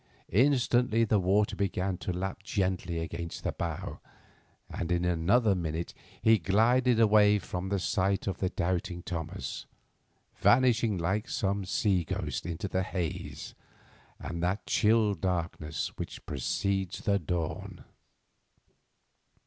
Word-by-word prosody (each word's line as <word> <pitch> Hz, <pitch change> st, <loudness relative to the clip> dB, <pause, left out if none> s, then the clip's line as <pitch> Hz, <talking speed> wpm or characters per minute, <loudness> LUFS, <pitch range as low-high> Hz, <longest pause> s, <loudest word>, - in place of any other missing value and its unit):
Instantly 125 Hz, -1 st, +3 dB
the 105 Hz, -2 st, +3 dB
water 100 Hz, +3 st, +2 dB
began 95 Hz, -1 st, -1 dB
to -, -, -3 dB
lap 95 Hz, +2 st, -4 dB
gently 95 Hz, -4 st, -1 dB
against 85 Hz, +1 st, -5 dB
the -, -, 0 dB
bow, -, -, -4 dB, 0.7 s
and 85 Hz, 0 st, -4 dB
in 90 Hz, 0 st, +1 dB
another 95 Hz, +6 st, +3 dB
minute 85 Hz, -2 st, -3 dB, 0.3 s
he 110 Hz, -1 st, +6 dB
glided 115 Hz, +6 st, +3 dB
away 105 Hz, -2 st, +6 dB
from 95 Hz, -1 st, -4 dB
the 100 Hz, -, +1 dB
sight 95 Hz, 0 st, 0 dB
of 95 Hz, -2 st, -3 dB
the 95 Hz, -, 0 dB
doubting 90 Hz, -1 st, -2 dB
Thomas, 80 Hz, -3 st, -5 dB, 0.7 s
vanishing 120 Hz, -4 st, +4 dB
like 95 Hz, +7 st, -1 dB
some 100 Hz, -1 st, -1 dB
sea 95 Hz, -1 st, +1 dB
ghost 80 Hz, -, -3 dB
into 85 Hz, +3 st, -3 dB
the 95 Hz, 0 st, 0 dB
haze 90 Hz, -3 st, -4 dB, 0.7 s
and 85 Hz, -1 st, -5 dB
that 90 Hz, +4 st, -1 dB
chill 110 Hz, -1 st, +3 dB
darkness 85 Hz, -3 st, -2 dB
which -, -, -6 dB
precedes 95 Hz, -2 st, -1 dB
the 100 Hz, -1 st, +2 dB
dawn. 85 Hz, -1 st, -4 dB
95 Hz, 125 wpm, -29 LUFS, 90-105 Hz, 0.7 s, he